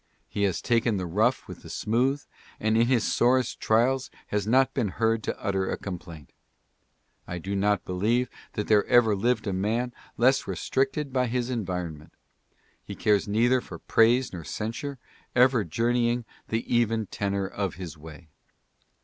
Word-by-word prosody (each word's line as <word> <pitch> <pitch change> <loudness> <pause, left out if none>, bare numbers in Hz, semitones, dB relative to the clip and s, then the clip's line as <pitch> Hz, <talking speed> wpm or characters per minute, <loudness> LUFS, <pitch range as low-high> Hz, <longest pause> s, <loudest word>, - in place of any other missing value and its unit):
He 100 - -1
has 95 -4 -1
taken 115 -2 +2
the 90 - -2
rough 95 +6 +1
with - - -9
the - - -12
smooth, 130 +6 0 0.4
and 110 +1 +1
in 115 +1 +4
his 120 -3 +2
sorest 125 +2 +2
trials 125 +4 +2 0.2
has 105 0 -1
not 130 +3 +3
been 120 -6 0
heard 110 +3 0
to - - -4
utter 95 -2 -1
a - - -2
complaint. 85 -5 -8 1.0
I 85 - -4
do 95 +4 -4
not 100 0 +1
believe 110 +7 +1 0.3
there 105 -1 +2
ever 115 -4 +5
lived 115 +3 0
a 100 - -1
man 115 +6 -1 0.2
less 130 +3 +3
restricted 135 +1 -1
by 125 -1 +2
his 125 +1 -1
en 115 -7 -2
vironment. 85 -4 -5 0.7
He - - -8
cares 105 -1 +2
neither 120 +5 +3
for - - -9
praise 120 +2 +3
nor 85 -3 -6
censure, 115 - -4 0.4
ever 125 -2 +5
jour 115 +8 0
neying 120 0 +1
" - - -32
the 115 +1 0
even 115 -2 +1
tenor 100 0 -2
of 100 -2 -3
his 90 -3 -7
way." 80 0 -12
110 Hz, 165 wpm, -27 LUFS, 100-120 Hz, 1.0 s, ever